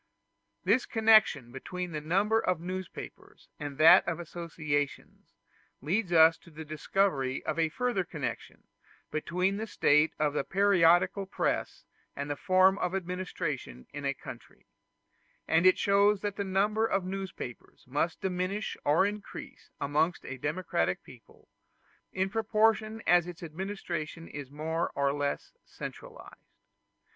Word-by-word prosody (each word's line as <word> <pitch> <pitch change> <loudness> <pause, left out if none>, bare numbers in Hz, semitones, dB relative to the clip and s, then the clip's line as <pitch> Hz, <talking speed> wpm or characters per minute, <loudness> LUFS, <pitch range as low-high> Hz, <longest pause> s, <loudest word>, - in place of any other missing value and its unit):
This 255 - +2
connection 215 - +4
between 180 +7 -5
the 155 -1 -4
number 195 +8 +2
of 180 -6 0
newspapers 185 +1 -8
and 145 -2 -6
that 155 +2 +8
of 170 -1 -2
associations 155 -4 -4 0.5
leads 180 - -1
us 165 -1 +6
to - - -17
the 160 0 -9
discovery 150 -3 0
of 155 +1 -2
a 160 -1 +2
further 245 +1 -1
connection 160 -5 -6 0.5
between 180 +5 0
the 220 +1 -4
state 150 -5 +3
of 150 -1 +1
the 150 - 0
periodical 190 0 +3
press - - -2 0.3
and 140 +1 -4
the - - -1
form 185 +5 +4
of 180 - -1
the - - +1
administration 180 - -4
in 145 - -6
a 140 0 -1
country; - - -12 0.8
and 165 +3 +4
shows 200 0 +3
that 205 -1 -3
the 200 - -2
number 205 +3 +1
of 195 -3 0
newspapers 190 -10 -7
must 145 +6 -1
diminish 190 +3 -2
or 150 +6 +4
increase 205 0 -7
amongst 155 +5 0
a 135 - -6
democratic 175 +4 -1
people, 125 -3 -17 0.6
in 190 +1 0
proportion 220 +1 +1
as 175 -1 +4
its 175 -1 -9
administration 170 -2 -5
is 145 -2 -8
more 160 +3 -2
or 140 0 +1
less 145 0 -3
centralized. - - -10
175 Hz, 135 wpm, -30 LUFS, 150-195 Hz, 0.8 s, that